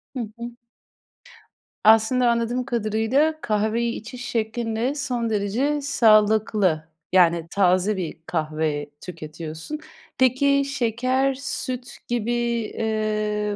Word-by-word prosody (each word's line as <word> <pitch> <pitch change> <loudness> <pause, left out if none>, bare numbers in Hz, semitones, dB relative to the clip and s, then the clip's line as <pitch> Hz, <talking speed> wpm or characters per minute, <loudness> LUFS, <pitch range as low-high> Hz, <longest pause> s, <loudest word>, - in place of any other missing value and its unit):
Hı - - -3 0.2
hı. 235 +1 -6 1.3
Aslında 225 +3 +5
anladığım 235 +2 0
kadarıyla 240 +6 +1
kahveyi 220 +2 0
içiş 245 +3 -8
şeklinde 225 +3 -1
son 245 -5 -2
derece 230 +8 0
sağlıklı, 215 - +3 0.3
yani 170 -3 +4
taze 190 +1 +2
bir 175 -4 -4
kahve 155 -3 -2
tüketiyorsun. 160 - -7 0.4
Peki 280 +2 +3
şeker, 260 0 0
süt 255 -2 -5
gibi, 240 -1 -1
eee, 215 -3 -1
225 Hz, 95 wpm, -23 LUFS, 205-250 Hz, 1.3 s, Aslında